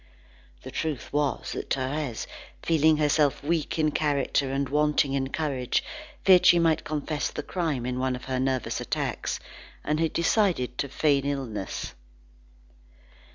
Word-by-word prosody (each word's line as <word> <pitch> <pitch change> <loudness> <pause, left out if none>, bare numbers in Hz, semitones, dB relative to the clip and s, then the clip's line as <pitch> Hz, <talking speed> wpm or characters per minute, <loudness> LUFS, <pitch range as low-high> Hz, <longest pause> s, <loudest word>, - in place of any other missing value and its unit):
The - - -8
truth 155 -5 -3
was 145 -2 0
that - - -5
Thérèse, 135 -2 -2 0.4
feeling 160 -1 +4
herself 150 -2 +2
weak 160 +1 -1
in 155 -1 +2
character 140 -2 0
and 140 0 0
wanting 150 0 +2
in 135 -1 0
courage, 135 -5 -1 0.4
feared 185 -2 +7
she 175 - +8
might 165 -2 +2
confess 150 0 -2
the - - -5
crime 155 -9 -2
in 125 0 -2
one 130 0 0
of 125 - -9
her 130 -1 -2
nervous 130 -1 -1
attacks, - - -2 0.4
and 150 +1 0
had 165 -1 0
decided 170 - +1
to 140 - -1
feign 140 0 +2
illness. 120 -9 -4
145 Hz, 145 wpm, -27 LUFS, 130-155 Hz, 0.4 s, she